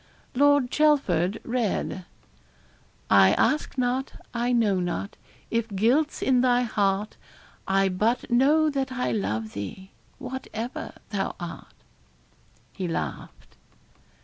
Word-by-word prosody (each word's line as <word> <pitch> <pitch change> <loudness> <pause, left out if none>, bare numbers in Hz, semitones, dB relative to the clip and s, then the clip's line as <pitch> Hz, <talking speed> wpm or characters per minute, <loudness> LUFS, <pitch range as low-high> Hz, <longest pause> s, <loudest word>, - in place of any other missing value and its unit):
Lord 285 -1 +4
Chelford 220 - +2
read 230 -6 -2 1.1
I 100 -1 +7
ask 305 -2 +1
not, 255 +1 -1 0.2
I 240 +1 0
know 215 -6 +2
not, 175 +3 -3 0.4
if 230 -1 0
guilt's 260 +10 +2
in 255 -2 +3
thy 250 -1 +3
heart 205 -2 0 0.5
I 195 0 +3
but 220 +7 0
know 300 +5 +4
that 270 -2 -2
I 250 -1 -1
love 110 - -2
thee, 100 - -7 0.3
whatever 250 -2 -6 0.2
thou 195 -2 -2
art.' 175 -2 -8 1.0
He 185 -3 -4
laughed. 165 - -6
230 Hz, 110 wpm, -26 LUFS, 190-260 Hz, 1.1 s, I